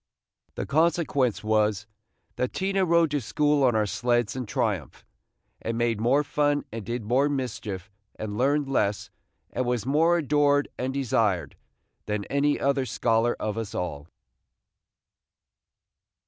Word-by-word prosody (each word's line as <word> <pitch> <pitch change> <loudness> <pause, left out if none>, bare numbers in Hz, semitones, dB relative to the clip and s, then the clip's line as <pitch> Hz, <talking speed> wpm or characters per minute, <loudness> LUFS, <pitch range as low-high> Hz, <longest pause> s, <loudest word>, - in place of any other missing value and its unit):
The - - -3
consequence 150 -7 +1
was, 110 -1 +1 0.5
that 125 - -2
Tina 195 0 0
rode 170 -2 +3
to 145 -1 0
school 150 +3 +1
on 125 -3 +4
our 110 -1 +2
sleds 120 +1 0
in 125 -3 -4
triumph, 100 - -2 0.6
and 115 0 -3
made 115 -2 0
more 135 +6 +3
fun, 145 0 0
and 115 -1 -5
did 120 +2 -4
more 130 +7 +2
mischief, 105 -9 -4 0.2
and 105 -1 -5
learned 140 +4 +1
less, 105 -6 0 0.4
and - - -1
was 120 -3 -1
more 160 +6 +3
adored 145 -2 +2
and 130 +1 -2
desired, 110 - 0 0.5
than 105 -1 -2
any 145 +1 +2
other 140 -2 +1
scholar 115 0 +1
of 110 +1 -2
us 110 -3 -5
all. 80 -4 -4
125 Hz, 135 wpm, -26 LUFS, 110-145 Hz, 0.6 s, on